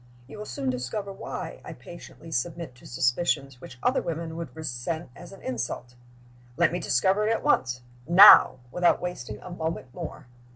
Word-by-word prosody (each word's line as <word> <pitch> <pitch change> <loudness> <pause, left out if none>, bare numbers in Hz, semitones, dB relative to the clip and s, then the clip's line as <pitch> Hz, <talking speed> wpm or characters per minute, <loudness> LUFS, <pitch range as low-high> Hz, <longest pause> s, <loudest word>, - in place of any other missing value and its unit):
You 145 +9 -11
will 210 - -7
soon 130 +1 -2
discover 195 - -4
why - - -7
I - - -8
patiently 165 -1 -12
submit 165 +1 -3
to 125 - -16
suspicions 130 +1 0
which 125 - -11
other - - +2
women 165 0 -4
would 170 -1 -7
resent 155 +1 -4
as 175 +2 -12
an 195 - -14
insult." 125 0 -4 0.6
"Let 170 -2 +3
me 175 - -2
discover 190 - +2
it - - +2
at 225 - -1
once. 125 -1 +1 0.3
Now! 185 -1 +9
Without 175 +4 +3
wasting 125 -12 -6
a 180 - -9
moment 160 -6 -4
more!" 165 -4 -7
160 Hz, 170 wpm, -26 LUFS, 125-175 Hz, 0.6 s, Now